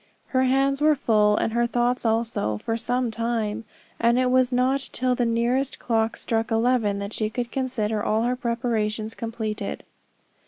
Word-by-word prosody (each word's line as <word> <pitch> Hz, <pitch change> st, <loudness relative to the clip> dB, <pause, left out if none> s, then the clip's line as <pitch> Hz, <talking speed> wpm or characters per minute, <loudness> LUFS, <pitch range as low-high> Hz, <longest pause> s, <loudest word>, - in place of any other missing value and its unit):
Her 260 Hz, 0 st, +2 dB
hands 270 Hz, +2 st, +2 dB
were 305 Hz, 0 st, +5 dB
full, 210 Hz, -5 st, +3 dB
and 225 Hz, -, 0 dB
her 235 Hz, 0 st, +2 dB
thoughts 240 Hz, 0 st, 0 dB
also, 225 Hz, -, 0 dB
for 225 Hz, -, -3 dB
some 245 Hz, +1 st, -1 dB
time; 230 Hz, -1 st, -2 dB, 0.3 s
and 235 Hz, +1 st, +3 dB
it 255 Hz, 0 st, +2 dB
was 255 Hz, 0 st, +3 dB
not 255 Hz, +2 st, +2 dB
till 255 Hz, 0 st, 0 dB
the 245 Hz, -1 st, 0 dB
nearest 240 Hz, +4 st, 0 dB
clock 225 Hz, -1 st, 0 dB
struck 225 Hz, 0 st, -1 dB
eleven 225 Hz, -3 st, +2 dB
that 200 Hz, +1 st, -5 dB
she 215 Hz, -1 st, -1 dB
could 240 Hz, +1 st, -4 dB
consider 225 Hz, -5 st, -1 dB
all 220 Hz, +1 st, +1 dB
her 245 Hz, +1 st, +1 dB
preparations 230 Hz, -3 st, -2 dB
completed. 225 Hz, -2 st, -4 dB
235 Hz, 165 wpm, -24 LUFS, 220-250 Hz, 0.3 s, were